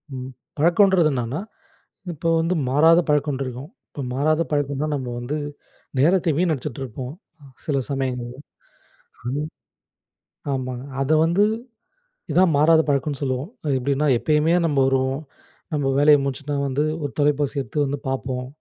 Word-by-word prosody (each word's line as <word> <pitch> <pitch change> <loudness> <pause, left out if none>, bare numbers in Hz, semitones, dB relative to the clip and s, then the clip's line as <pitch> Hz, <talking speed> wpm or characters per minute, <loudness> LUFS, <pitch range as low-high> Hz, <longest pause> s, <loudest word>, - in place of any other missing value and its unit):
ம் 130 +1 -6 0.3
பழக்கம்ன்றது 175 0 +4
என்னன்னா, 125 +5 -2 0.7
இப்போ 165 +2 -3
வந்து 165 +3 0 0.2
மாறாத 160 +5 +6
பழக்க 150 0 +2
ஒன்றிருக்கும். 135 +2 -5 0.2
இப்போ 140 - -7
மாறாத 155 +4 +2
பழக்கம்னா 145 0 -1
நம்ம 130 -3 -3
வந்து 135 +5 -3 0.6
நேரத்தை 170 +3 +3
வினடிச்சுட்டு 150 -7 -1
இருப்போம் 130 +3 -7 0.5
சில 140 -3 0
சமயங்கள்ல 125 -2 -3 0.9
அந் 135 +4 -2 1.1
ஆமாங்க. 130 -1 -4 0.2
அத 135 +3 0
வந்து 175 +5 +3 0.9
இதான் 180 -2 +4
மாறாத 160 +2 +5
பழக்கன்னு 140 0 0
சொல்லுவோம். 130 +4 -2
அது 145 - 0
எப்படின்னா 140 +3 0
எப்பயுமே 150 +6 +2
நம்ம 145 -3 0
வருவோம், 135 +1 +1 0.5
நம்ம 145 -2 0
வேலையை 145 0 +6
முடிச்சுட்டா 140 +1 -3
வந்து 140 +3 0 0.2
ஒரு 145 - -2
தொலைபேசி 145 -1 +1
எடுத்து 145 +5 -1
வந்து 140 +1 -2
பார்ப்போம். 130 -1 -3
145 Hz, 130 wpm, -23 LUFS, 130-155 Hz, 1.1 s, மாறாத